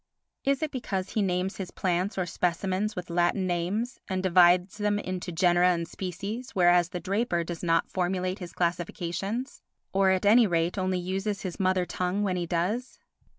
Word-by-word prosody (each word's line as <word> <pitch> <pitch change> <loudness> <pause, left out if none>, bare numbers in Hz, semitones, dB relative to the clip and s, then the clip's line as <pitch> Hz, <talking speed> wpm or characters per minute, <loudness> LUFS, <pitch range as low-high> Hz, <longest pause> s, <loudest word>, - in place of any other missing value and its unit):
Is 275 +2 +1
it 310 - -1
because 195 -8 -3
he 215 - 0
names 185 0 -1
his 190 -2 -5
plants 185 +2 -1
or 185 - 0
specimens 185 +4 -1
with 180 -1 -6
Latin 175 +2 +1
names 185 +8 -2
and 185 -1 -2
divides 180 +2 +4
them 205 0 +1
into 185 -2 -4
genera 175 +1 +4
and 170 -2 0
species, 200 +8 -6
whereas 175 -1 +4
the 180 - -4
draper 195 -2 0
does 170 0 -6
not 165 -1 +2
formulate 185 0 -1
his 175 -2 -7
classifications, 180 +7 -3 0.3
or 195 0 +4
at 190 +1 +1
any 225 +2 +6
rate 170 -1 0
only 185 -1 0
uses 190 +3 -2
his 185 -3 -5
mother 185 -1 +2
tongue 185 +3 -1
when 190 -3 0
he 175 -1 -2
does? 205 +9 -1
185 Hz, 175 wpm, -27 LUFS, 175-200 Hz, 0.3 s, any